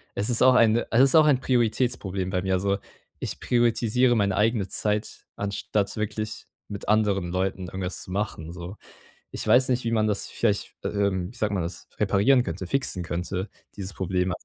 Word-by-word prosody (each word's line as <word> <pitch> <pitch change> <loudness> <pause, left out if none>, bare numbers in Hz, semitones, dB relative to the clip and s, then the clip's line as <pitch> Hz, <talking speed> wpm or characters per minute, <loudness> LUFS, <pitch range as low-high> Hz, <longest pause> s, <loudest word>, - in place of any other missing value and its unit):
es 105 - -1
ist 120 - +1
auch 130 0 +6
eine 115 -1 +4
es 115 - +5
ist 135 +3 +5
auch 155 -1 +7
ein 145 -4 +4
Prioritätsproblem 115 -6 0
bei 90 - 0
mir, 95 0 0
also, 100 +1 0 0.4
ich - - -5
prioritisiere 120 +1 +2
meine 100 -3 +1
eigene 110 -2 +2
Zeit, 105 +2 -2
anstatt 100 0 -2
wirklich 110 +1 -4 0.2
mit 100 -1 -6
anderen 105 -4 +2
Leuten 95 0 -2
irgendwas 90 0 -5
zu - - -10
machen, 95 -5 -3
so. 90 +3 -8 0.5
Ich - - -5
weiß 125 +4 +5
nicht, 125 0 +1
wie 115 - 0
man 110 -2 +2
das 105 -2 -1
vielleicht, 105 -4 -1
ähm, 100 -2 -1
wie - - -18
sagt 105 -2 0
man 95 -4 0
das 85 +2 -7
reparieren 105 +6 +4
könnte, 90 -1 -5
fixen 135 -6 -1
könnte 90 +3 -3 0.3
dieses 95 -1 -5
Problem. 90 -1 -1
105 Hz, 185 wpm, -25 LUFS, 95-115 Hz, 0.5 s, auch